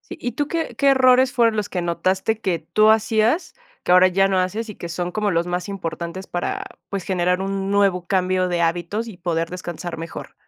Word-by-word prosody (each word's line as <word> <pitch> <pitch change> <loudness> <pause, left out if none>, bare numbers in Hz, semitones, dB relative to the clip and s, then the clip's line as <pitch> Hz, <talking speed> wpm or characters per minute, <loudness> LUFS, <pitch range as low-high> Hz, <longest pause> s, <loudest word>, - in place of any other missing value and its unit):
Sí, - - -11
¿y 245 - -3
tú 290 0 -2
qué 330 -1 -3
qué 280 0 +3
errores 260 -1 +5
fueron 230 -3 +3
los 210 -1 -1
que 180 - -2
notaste 185 +5 0
que 185 -6 0
tú 215 +7 +3
hacías, 220 - +2 0.3
que - - +2
ahora 180 +1 +7
ya 195 +1 +2
no 190 -1 +1
haces, 205 +5 -1
y 210 - -7
que 170 - -7
son 175 +1 -3
como 210 0 0
los 170 -1 0
más 180 +1 -3
importantes 170 -1 -5
para, 175 - -3 0.3
pues, 200 -2 -3
generar 180 -1 0
un 195 0 -2
nuevo 195 -3 +2
cambio 185 -1 +1
de 175 -1 -1
hábitos 175 +7 -1
y 215 - -9
poder 165 -1 -2
descansar 175 -1 -6
mejor? 165 0 -8
185 Hz, 210 wpm, -22 LUFS, 175-215 Hz, 0.3 s, ahora